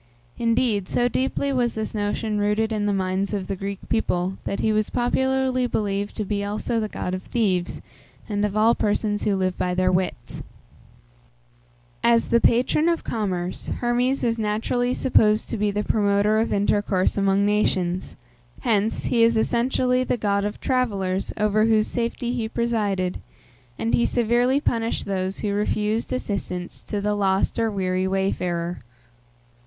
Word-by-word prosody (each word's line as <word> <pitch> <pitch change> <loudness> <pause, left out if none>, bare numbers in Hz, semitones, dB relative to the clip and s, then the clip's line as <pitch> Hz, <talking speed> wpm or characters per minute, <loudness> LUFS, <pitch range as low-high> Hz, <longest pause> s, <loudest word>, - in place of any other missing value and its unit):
Indeed, 230 -4 +1
so 245 - +2
deeply 270 +2 -1
was 245 -2 0
this 220 0 -3
notion 210 0 -1
rooted 210 +2 +1
in 210 -1 0
the - - +2
minds 190 +1 -1
of 195 -2 -3
the 195 - -3
Greek 195 +1 -6
people, 190 -4 -1
that 200 - -2
he 220 - +2
was 215 0 +1
popularly 260 +1 +1
believed 205 -2 -2
to 215 - -3
be 200 0 -2
also 215 +2 -2
god 180 -3 -4
of 185 - -3
thieves, 185 -6 -1 0.5
and 205 -1 -1
of 210 0 -1
all 225 +2 +5
persons 205 -1 0
who 200 - +2
live 185 -1 0
by 180 0 0
their 185 0 +2
wits. 185 0 -2 1.6
As 235 -1 +3
the 235 0 +3
patron 255 +7 +3
of 335 - 0
commerce, 185 -5 -3
Hermes 245 +2 0
was 230 -1 0
naturally 230 +4 0
supposed 215 -4 +3
to - - -2
be 210 0 +1
the 205 +1 -1
promoter 205 0 +2
of 225 - 0
intercourse 205 -2 +1
among 195 0 +2
nations; 185 -4 0 0.5
hence, 220 -2 0
he 235 - +2
is 230 0 +4
essentially 250 +2 +1
the 250 - -1
god 200 -2 0
of 205 - -4
travellers, 200 -8 -1
over 215 +1 +2
whose 220 -1 +3
safety 240 +1 -2
he 230 -3 -2
presided, 205 -6 -1 0.6
and 230 - -2
he 235 - +3
severely 245 +3 +2
punished 230 -5 -1
those 190 -1 -2
who 205 -1 -1
refused 210 +2 -1
assistance 185 -7 -4
to 205 - -4
the 210 +1 0
lost 195 +1 +1
or 225 -1 +2
weary 185 -2 -1
wayfarer. 180 -3 -1
210 Hz, 160 wpm, -23 LUFS, 195-235 Hz, 1.6 s, all